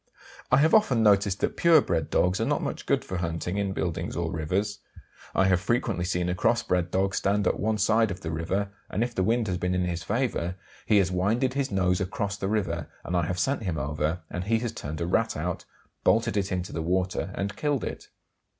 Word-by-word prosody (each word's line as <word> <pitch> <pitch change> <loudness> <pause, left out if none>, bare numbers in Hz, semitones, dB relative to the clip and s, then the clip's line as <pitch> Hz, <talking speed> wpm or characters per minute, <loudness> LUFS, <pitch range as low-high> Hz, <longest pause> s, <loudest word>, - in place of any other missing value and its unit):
I - - +6
have 155 +3 +4
often 135 - +4
noticed 100 -2 +3
that - - 0
pure 170 -2 +6
bred 80 - -1
dogs 90 +1 +2
are - - +2
not - - 0
much - - -4
good - - +1
for 95 - -4
hunting 85 +3 -2
in 100 -1 0
buildings 85 -2 -3
or 85 -1 -2
rivers. 95 +6 -1 0.6
I 95 - +4
have 95 -2 +3
frequently 110 -3 0
seen 90 -1 0
a 90 - 0
cross 90 - +2
bred 90 -1 0
dog 95 +1 0
stand 100 +1 +1
at - - +1
one 110 +1 +1
side 110 +2 +3
of 95 - -6
the 80 - -4
river, 95 +5 -2 0.2
and 105 - 0
if 120 0 -3
the 95 - -1
wind 115 +4 +2
has 90 -2 -1
been 90 0 0
in 90 0 +1
his 85 -1 -2
favour 105 -6 -1 0.3
he 105 - +5
has 95 -2 +3
winded 110 +8 +1
his 140 0 -1
nose 90 -3 +1
across 100 +2 -2
the 100 -1 -3
river, 85 -7 -1 0.2
and 90 - -2
I 85 -2 +1
have 90 - -2
sent 135 +10 0
him 90 -6 -2
over 75 +5 -1
and 90 0 -3
he 115 +2 +2
has 115 0 -2
turned 80 -9 -6
a - - 0
Rat 115 +6 +1
out, 90 +3 -3 0.4
bolted 115 -1 +3
it 100 -1 0
into 90 -1 -3
the 80 - -2
water, 95 +3 -1
and 100 +1 -3
killed 145 -4 0
it. - - -6
95 Hz, 230 wpm, -27 LUFS, 90-110 Hz, 0.6 s, I